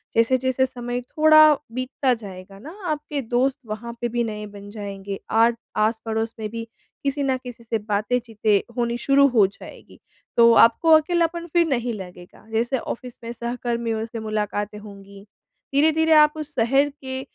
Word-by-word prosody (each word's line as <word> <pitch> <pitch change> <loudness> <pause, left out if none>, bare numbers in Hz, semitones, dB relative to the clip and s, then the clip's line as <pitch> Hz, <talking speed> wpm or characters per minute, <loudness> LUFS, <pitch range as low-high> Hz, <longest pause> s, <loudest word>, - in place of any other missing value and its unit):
जैसे-जैसे 260 +3 +2
समय 245 -1 -5
थोड़ा 310 +3 +6 0.2
बीतता 255 +1 -1
जाएगा 195 -3 -9
न 310 - -10 0.2
आपके 295 -2 -3
दोस्त 260 +2 +2
वहाँ 220 +2 -6
पे 240 - 0
भी 240 0 -1
नए 210 -1 -5
बन 205 0 -11
जाएँगे, 200 -2 -6
आट 230 +1 +4 0.2
आस-पड़ोस 220 +1 -1
में 215 -1 -4
भी 230 +1 -5 0.4
किसी 280 0 -1
न 265 -1 +1
किसी 245 -2 -10
से 225 0 -1
बातें 215 +3 -1
चीतें 220 -3 +1 0.2
होनी 235 0 0
शुरू 280 +2 +4
हो 230 -7 +4
जाएगी 200 - -14 0.4
तो 235 0 +7
आपको 230 +9 +5
अकेलापन 340 +1 -1
फिर 340 -1 +4
नहीं 245 -4 -1
लगेगा। 180 0 -11
जैसे 235 +4 0
ऑफ़िस 245 +1 -7
में 230 - -5
सहकर्मियों 235 -1 -3
से 230 0 -7
मुलाकातें 210 -1 -3
होंगी, 200 -1 -13 0.5
धीरे-धीरे 320 +2 +4
आप 300 -1 +6
उस 295 -1 -7
शहर 270 +4 +3
के 260 -1 -5
235 Hz, 160 wpm, -23 LUFS, 215-270 Hz, 0.5 s, तो